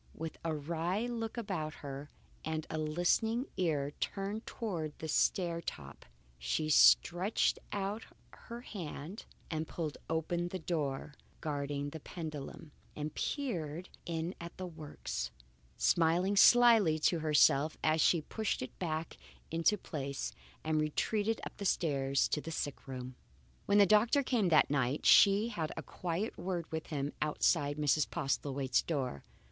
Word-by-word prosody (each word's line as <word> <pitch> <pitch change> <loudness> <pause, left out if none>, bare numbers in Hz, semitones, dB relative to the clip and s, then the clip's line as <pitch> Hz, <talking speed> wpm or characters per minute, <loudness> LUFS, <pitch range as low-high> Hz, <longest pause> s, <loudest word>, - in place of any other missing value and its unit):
With 160 -1 -6
a 165 - -1
wary 170 +8 -1
look 230 -1 -4
about 175 -9 -3
her 140 +1 -6 0.3
and 160 0 -3
a 155 - -2
listening 175 - +1
ear 150 -6 0
turned 200 +3 -3
towards 165 -9 -4
the 160 - -6
stair 170 +2 +1
top, 70 - -8 0.3
she 155 - -1
stretched 175 +6 +5
out 200 +2 -3 0.3
her 235 +1 -9
hand 180 - -7 0.2
and 160 0 -2
pulled 155 -4 -4
open 165 +2 -1
the 185 - -4
door 150 -4 -3 0.3
guarding 145 -2 -3
the 160 - -7
pendulum, 155 -2 -7 0.2
and 150 0 -4
peered 175 - -3 0.2
in 165 +1 -2
at 170 0 -8
the 185 - -4
works, 155 - -5 0.5
smiling 170 - +3
slyly 225 -7 +7
to 165 +2 +2
herself 155 -1 +4
as 155 0 +3
she 170 +1 +4
pushed 220 -4 -2
it 130 - -9
back 160 -2 -3 0.3
into 165 +6 +2
place 140 -6 -4 0.3
and 155 -1 +1
retreated 210 +8 0
upstairs 140 -8 0
to 150 - 0
the 165 - -7
sick 145 -4 -4
room. 130 -1 -6 0.5
When 200 - +4
the 205 - +8
doctor 220 +8 +4
came 230 -8 +1
that 155 -3 +5
night 135 0 0
she 205 +3 +7
had 160 -8 -3
a 160 - -4
quiet 175 - -3
word 175 -2 -2
with 160 0 -4
him 145 -1 -3
outside 150 -1 +1
Mrs. 150 0 +2
Postlethwaite's 135 -4 0
door. 130 - -3
160 Hz, 140 wpm, -33 LUFS, 150-190 Hz, 0.5 s, the